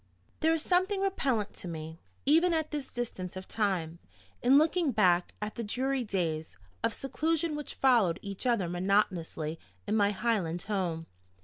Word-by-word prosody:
THERE 320 +1 +3
is 315 - -2
something 375 +2 +2
repellent 265 - 0
to - - -7
me, 160 -1 -6 0.3
even 330 +4 +4
at 315 -1 -1
this 290 -3 -3
distance 190 -7 -4
of 185 0 -7
time, 180 -6 -1 0.4
in 260 +3 +6
looking 320 0 +3
back 180 -6 +3
at 210 - -4
the 235 - -4
dreary 260 +4 -1
days, 165 -7 -2 0.3
of - - +2
seclusion 320 +3 -1
which 295 -1 -6
followed 235 -10 +4
each 200 +4 -4
other 230 -7 +2
monotonously 175 -3 0 0.3
in - - 0
my 205 -2 +4
Highland 195 -5 0
home. 175 -6 -2
215 Hz, 155 wpm, -30 LUFS, 180-285 Hz, 0.4 s, in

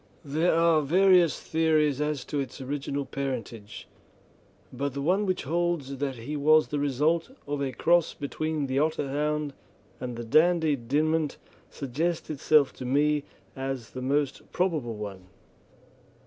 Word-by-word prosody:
There 160 +5 +1
are 165 -1 +4
various 180 +2 +4
theories 155 -3 +1
as 150 -3 -2
to 145 - -3
its 135 -1 -5
original 140 +1 -3
parentage, 125 -6 -5 0.9
but 140 +1 -3
the 140 - -2
one 190 +6 +2
which 185 - -1
holds 160 -3 -1
that 135 -1 -2
he 125 +6 -6
was 155 +2 +4
the 145 - -1
result 150 - +1 0.2
of 145 0 -3
a 135 -2 -1
cross 170 +7 +2
between 155 +1 -2
the 135 0 0
Otterhound 150 -1 -1 0.5
and 125 -2 -5
the 120 - -4
Dandie 160 +4 +3
Dinmont 150 +5 0 0.3
suggests 155 +6 -2
itself 150 -1 +3
to - - -6
me 145 +3 +2 0.3
as 135 -3 -4
the 130 - -6
most 140 +1 -1
probable 155 -11 -1
one. 100 -3 -7
145 Hz, 140 wpm, -27 LUFS, 135-160 Hz, 0.9 s, are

